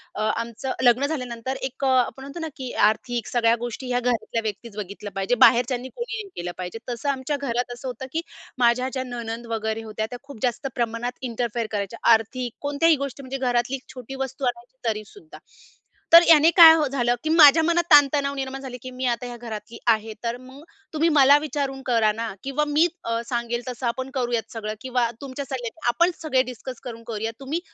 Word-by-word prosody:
अ, - - -3
आमचं 230 +4 -2
लग्न 245 +3 +5
झाल्यानंतर 255 -3 -4
एक 265 +1 -5
अ, - - +3
आपण 260 +1 +1
म्हणतो 280 +5 -8
ना 320 - -3
की 255 -2 -5 0.2
आर्थिक 235 +1 -2
सगळ्या 230 -1 +3
गोष्टी 240 +2 -5
ह्या 245 0 +1
घरातल्या 235 -2 -1
व्यक्तीच 215 +1 -5
बघितल्या 205 0 -6
पाहिजे. 195 +5 0
बाहेरच्यांनी 245 +1 +2
कोणी 475 -1 -4
नाही 395 - -13
केलं 175 - -4
पाहिजे. 185 +5 -6
तसं 240 +4 -3
आमच्या 275 +1 -1
घरात 245 -2 -2
असं 245 +2 -8
होतं 250 +1 -5
की 325 - 0 0.4
माझ्या 250 +1 +3
ज्या 260 - -2
नणंद 235 -2 -6
वगैरे 220 0 -2
होत्या, 220 0 -3
त्या 245 0 -7
खूप 280 -5 -12
जास्त 250 +3 -1
प्रमाणात 235 +1 -2
इंटरफेअर 235 -2 -2
करायच्या, 205 +1 -3
आर्थिक 235 +2 -1
कोणत्याही 290 +3 +3
गोष्टी 275 0 -9
म्हणजे 265 +1 -5
घरातली 245 0 0
एक 265 - -9
छोटी 255 +1 -8
वस्तू 265 +1 -6
आणायची 245 +1 -4
तरी 215 -1 -2
सुद्धा. 355 -7 -14 0.8
तर 335 +1 +11
याने 320 0 +7
काय 325 -2 +11 0.2
झालं 245 -3 +1
की 310 - -2
माझ्या 320 -1 +8
मनात 340 +1 +2
ताण-तणाव 280 -1 +5
निर्माण 270 0 -4
झाले 255 -2 -7
की 255 - -7
"मी 255 +1 -4
आता 240 +1 -6
ह्या 240 -1 -7
घरातली 225 -1 -8 0.2
आहे, 220 0 -4
तर 235 +1 -2
मग 260 +3 -13 0.3
तुम्ही 320 +2 +2
मला 285 -2 +6
विचारून 280 -3 -3
करा 230 -4 +3
ना 225 0 -4
किंवा 275 +2 0
मी 305 +4 +4 0.2
अ, 230 0 -1
सांगेल 240 0 -2
तसं 245 0 -3
आपण 260 +3 -3
करूयात 240 -3 -1
सगळं 215 -2 -4
किंवा 250 -2 0
तुमचे 275 0 -6
सल्ले 260 -4 -4 0.2
आपण 345 +9 +3
सगळे 280 -5 +2
डिस्कस 250 +1 -8
करून 230 -2 -7
करूयात. 225 0 -3
तुम्ही 290 +5 -2
250 Hz, 195 wpm, -24 LUFS, 230-275 Hz, 0.8 s, तर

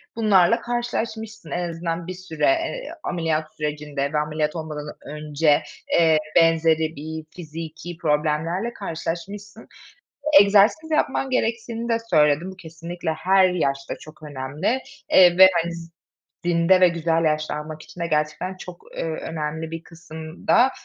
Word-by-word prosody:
bunlarla 210 -1 +4
karşılaşmışsın. 225 - -4
En 175 +2 -2
azından 165 0 -4
bir 185 - -4
süre, 180 -4 -3
eee, 335 +7 0
ameliyat 160 -3 -2
sürecinde 150 -1 -3
ve - - +1
ameliyat 150 +1 -1
olmadan 150 -2 -6
önce, 150 0 +1 0.4
eee, 160 -2 +5 0.2
benzeri 165 -1 +3
bir 160 +2 -6
fiziki 165 +1 -8
problemlerle 160 +7 0
karşılaşmışsın. 200 +4 -6 0.7
Egzersiz 210 +11 +4
yapman 270 -3 0
gerektiğini 230 -1 -1
de 230 -1 +2
söyledin. 150 +2 +3
Bu 190 - -11
kesinlikle 170 0 -6
her 190 +3 +4
yaşta 140 -6 -1
çok 155 0 -14
önemli, 150 - -2 0.3
eee, 180 -1 +7
ve, 190 0 +11
hani, 170 - -4
z 165 0 -9 0.5
zinde 175 +2 +4
ve 180 - +7
güzel 165 -1 0
yaşlanmak 155 0 -2
için 180 - -13
de 170 - 0
gerçekten 155 +4 -1
çok, 180 -2 -10
eee, - - -2
önemli 160 0 -4
bir 165 0 -6
kısımda 165 +9 0
165 Hz, 130 wpm, -23 LUFS, 155-190 Hz, 0.7 s, ve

